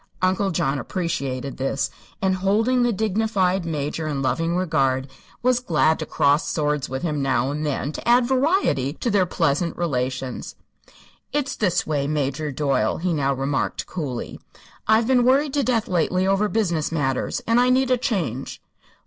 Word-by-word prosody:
Uncle 190 Hz, +2 st, +2 dB
John 150 Hz, -6 st, 0 dB
appreciated 140 Hz, -4 st, -3 dB
this, 135 Hz, +1 st, -1 dB, 0.3 s
and 190 Hz, -1 st, +2 dB
holding 220 Hz, +7 st, +2 dB
the 240 Hz, 0 st, +3 dB
dignified 200 Hz, -3 st, 0 dB
Major 155 Hz, 0 st, -3 dB
in 140 Hz, -3 st, -2 dB
loving 165 Hz, +5 st, 0 dB
regard 135 Hz, -7 st, +1 dB, 0.4 s
was 250 Hz, 0 st, +3 dB
glad 160 Hz, -8 st, +2 dB
to 155 Hz, -, -4 dB
cross 145 Hz, +2 st, +2 dB
swords 150 Hz, -3 st, -1 dB
with 130 Hz, +3 st, -4 dB
him 150 Hz, -4 st, -1 dB
now 135 Hz, 0 st, +1 dB
and 150 Hz, +1 st, -3 dB
then 145 Hz, -1 st, -2 dB
to -, -, -7 dB
add 245 Hz, +1 st, +5 dB
variety 260 Hz, -, +1 dB
to 235 Hz, +8 st, -2 dB
their 195 Hz, -3 st, +3 dB
pleasant 165 Hz, -1 st, 0 dB
relations. 130 Hz, -5 st, -3 dB, 0.8 s
"It's 290 Hz, -1 st, -1 dB
this 180 Hz, -4 st, +1 dB
way, 145 Hz, -2 st, -1 dB
Major 145 Hz, 0 st, -1 dB
Doyle," 135 Hz, -5 st, 0 dB
he 175 Hz, +1 st, -1 dB
now 140 Hz, -3 st, +1 dB
remarked, 135 Hz, +1 st, -1 dB
coolly. 140 Hz, -9 st, -5 dB, 0.5 s
"I've 220 Hz, +1 st, +4 dB
been 250 Hz, 0 st, +3 dB
worried 270 Hz, +3 st, +3 dB
to 285 Hz, -, +1 dB
death, 235 Hz, -4 st, +1 dB
lately, 180 Hz, +1 st, +1 dB
over 195 Hz, +2 st, +2 dB
business 175 Hz, -9 st, 0 dB
matters; 135 Hz, -5 st, -1 dB
and 230 Hz, +1 st, +3 dB
I 250 Hz, +1 st, +4 dB
need 260 Hz, 0 st, +3 dB
a -, -, +6 dB
change." 165 Hz, -, -2 dB
165 Hz, 165 wpm, -23 LUFS, 140-220 Hz, 0.8 s, a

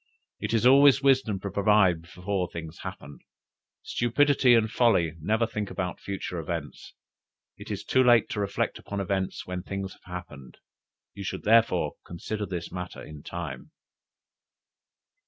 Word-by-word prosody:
It -, -, -3 dB
is 115 Hz, -, +1 dB
always 140 Hz, +1 st, +7 dB
wisdom 130 Hz, -7 st, +3 dB
to 100 Hz, -, -4 dB
provide 100 Hz, -4 st, +3 dB
before 90 Hz, +2 st, -3 dB
things 80 Hz, -2 st, -8 dB
happen; 70 Hz, +1 st, -8 dB, 0.6 s
stupidity 130 Hz, +1 st, +3 dB
and 110 Hz, -1 st, +3 dB
folly 105 Hz, -9 st, +2 dB
never 110 Hz, +7 st, +1 dB
think 105 Hz, -3 st, -4 dB
about 90 Hz, -1 st, -4 dB
future 95 Hz, -3 st, -5 dB
events. 80 Hz, -4 st, -6 dB, 0.6 s
It -, -, -11 dB
is -, -, -4 dB
too 130 Hz, -, +3 dB
late 120 Hz, -3 st, +5 dB
to -, -, -3 dB
reflect 100 Hz, -1 st, -1 dB
upon 100 Hz, -, -5 dB
events 95 Hz, 0 st, -2 dB
when 90 Hz, 0 st, -4 dB
things 95 Hz, 0 st, -5 dB
have -, -, -23 dB
happened; 70 Hz, -8 st, -9 dB, 0.6 s
you 100 Hz, -, -7 dB
should, -, -, -5 dB
therefore, 105 Hz, -8 st, +3 dB
consider 105 Hz, +4 st, -5 dB
this 85 Hz, -2 st, -5 dB
matter 90 Hz, -1 st, -6 dB
in 75 Hz, -1 st, -10 dB
time!'" 80 Hz, -6 st, -7 dB
95 Hz, 145 wpm, -27 LUFS, 85-110 Hz, 0.6 s, always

